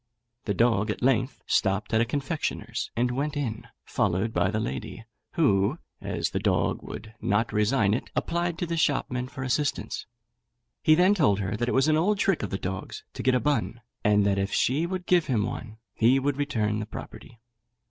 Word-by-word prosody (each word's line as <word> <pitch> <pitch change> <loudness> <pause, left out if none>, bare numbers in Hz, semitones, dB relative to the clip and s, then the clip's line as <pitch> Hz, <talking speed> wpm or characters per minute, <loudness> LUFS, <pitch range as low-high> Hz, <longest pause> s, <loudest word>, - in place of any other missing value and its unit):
The 100 - -1
dog 115 -1 +2
at 105 - -3
length 130 +1 +1
stopped 100 +1 +1
at 110 - +4
a - - +3
confectioner's, 135 -3 -3
and 125 +1 +1
went 145 +4 -2
in, 115 -4 -3 0.2
followed 100 +4 0
by - - +2
the 110 +2 -1
lady, 110 -1 -5 0.3
who, 115 - +2 0.2
as - - -2
the - - -1
dog - - +1
would 110 -1 -9
not 110 +3 +1
resign 105 -1 +2
it, 120 - -2
applied 170 0 -1
to 175 - -2
the 170 0 -3
shopman 130 -4 0
for 135 0 -7
assistance. 140 +3 -1 0.7
He 155 - +5
then 180 +4 +5
told 145 - +3
her 100 +1 -2
that 120 +3 -1
it - - 0
was 135 +2 +4
an 155 0 +4
old 200 +6 +2
trick 195 -3 +1
of 105 - -3
the 95 - -2
dog's 95 0 -5
to - - -5
get 130 -1 +3
a - - +3
bun, 120 -2 -1 0.2
and 105 -2 +4
that 100 -1 +2
if 100 +1 -1
she 150 +7 +1
would 180 0 -4
give 175 -2 +3
him 115 -6 +1
one 115 -3 -6 0.2
he 120 +4 +4
would 135 0 0
return 110 -7 0
the 110 - -4
property. 115 +1 -10
120 Hz, 200 wpm, -27 LUFS, 105-145 Hz, 0.7 s, He